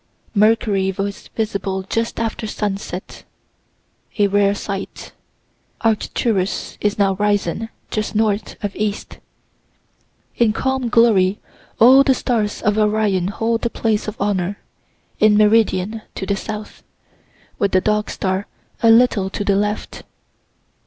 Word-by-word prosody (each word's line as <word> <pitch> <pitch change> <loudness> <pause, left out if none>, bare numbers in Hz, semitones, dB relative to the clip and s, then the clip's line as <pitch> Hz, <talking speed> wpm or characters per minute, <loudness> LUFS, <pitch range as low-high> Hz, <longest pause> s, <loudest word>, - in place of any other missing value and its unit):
Mercury 210 -2 +2
was 195 +1 -5
visible 200 -3 -2
just 230 +4 -2
after 225 -1 -3
sunset 195 -3 -5 0.9
a 205 - +4
rare 200 0 +2
sight. 200 -1 -6 0.7
Arcturus 215 -3 -1
is 210 0 0
now 195 -2 +3
risen, 205 0 0 0.2
just 215 0 -2
north 215 -1 0
of 205 -1 -3
east. 210 -1 -3 1.2
In 230 -3 +3
calm 265 0 -1
glory 210 -5 +4 0.4
all 255 +4 +8
the 265 -1 +3
stars 220 -5 -1
of 210 +1 +2
Orion 210 -4 +1
hold 225 +3 -1
the 235 - 0
place 220 -2 -1
of 215 - -6
honor, 200 -1 -1 0.6
in 210 -1 +5
meridian, 215 -1 +2
to 190 - -4
the 200 - 0
south, 210 +1 -7 0.8
with 200 - +1
the 185 - +4
Dog 210 +2 0
star 190 +1 -2 0.3
a 230 - +5
little 225 -4 +4
to 205 - -4
the 200 -1 +2
left. 210 +1 -2
210 Hz, 125 wpm, -19 LUFS, 200-225 Hz, 1.2 s, all